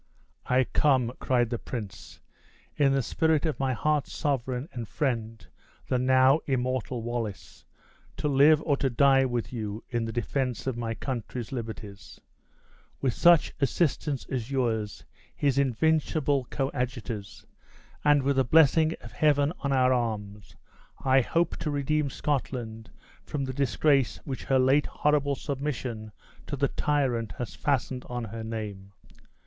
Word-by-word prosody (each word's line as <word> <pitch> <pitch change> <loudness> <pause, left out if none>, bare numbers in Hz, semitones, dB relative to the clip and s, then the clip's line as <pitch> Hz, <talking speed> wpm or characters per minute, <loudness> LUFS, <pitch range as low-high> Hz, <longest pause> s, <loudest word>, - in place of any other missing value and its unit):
"I 130 +1 +4
come," 130 -3 +2
cried 120 -2 +1
the 120 - -2
prince, 100 - -7 0.6
"in 140 -2 +3
the 135 -1 +1
spirit 160 +4 +1
of 155 - -1
my 135 -1 +1
heart's 145 +6 0
sovereign 130 -2 -2
and 120 -3 -5
friend, 115 -5 -2 0.4
the 130 - +2
now 130 +3 +5
immortal 130 -2 -1
Wallace, 115 -4 -5 0.5
to - - -1
live 145 +2 +5
or 145 - +2
to 135 - 0
die 135 +2 +4
with 120 -1 -3
you 110 -2 -4
in 120 -2 -1
the 115 - -4
defense 125 +2 -2
of 130 -3 -1
my 115 -1 -3
country's 120 0 -5
liberties. 110 -5 -7 0.8
With 130 -3 0
such 170 -2 +5
assistance 140 0 0
as 125 -2 -4
yours, 115 -6 -1 0.3
his 140 -2 +1
invincible 140 +1 +1
coadjutors, 125 -6 -4 0.6
and 145 -2 +4
with 140 0 +1
the 135 - +5
blessing 160 +3 +4
of 115 - -10
Heaven 145 +2 +2
on 140 - -2
our 130 -1 +4
arms, 105 -4 -3 0.5
I 130 0 +5
hope 170 +7 0
to 155 - -3
redeem 145 +1 0
Scotland 120 -6 -3 0.3
from 145 -2 -3
the 130 - -4
disgrace 135 -3 +2
which 135 -2 -5
her 135 - +3
late 135 +3 +3
horrible 145 -1 +1
submission 130 -6 -4 0.4
to 145 - -3
the 140 0 +1
tyrant 130 -7 0
has 120 -5 -6
fastened 130 -2 -1
on 120 -1 -3
her 115 0 -6
name. 105 -3 -6
130 Hz, 145 wpm, -27 LUFS, 115-140 Hz, 0.8 s, now